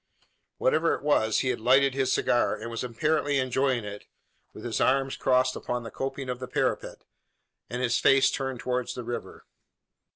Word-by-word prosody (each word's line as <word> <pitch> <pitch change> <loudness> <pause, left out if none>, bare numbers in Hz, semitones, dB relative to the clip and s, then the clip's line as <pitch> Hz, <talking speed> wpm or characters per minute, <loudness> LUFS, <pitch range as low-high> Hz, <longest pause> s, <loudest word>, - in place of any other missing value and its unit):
Whatever - - +2
it - - -10
was, 110 -7 +2
he 130 - 0
had 125 - -1
lighted 130 +4 +4
his 135 -1 0
cigar, 120 - +2
and 115 +1 -7
was 115 - -4
apparently 145 +4 0
enjoying 130 -2 0
it, 105 0 -8 0.4
with - - -11
his - - -2
arms 135 0 +2
crossed 130 0 +2
upon 125 0 -3
the 115 - -8
coping 135 0 -4
of 125 -1 -4
the 130 - -6
parapet, - - -2 0.7
and 125 +1 -3
his 120 -1 +2
face 135 0 +5
turned 135 -2 -3
towards 125 0 -2
the 125 - -5
river. 120 +1 -6
130 Hz, 175 wpm, -27 LUFS, 120-135 Hz, 0.7 s, face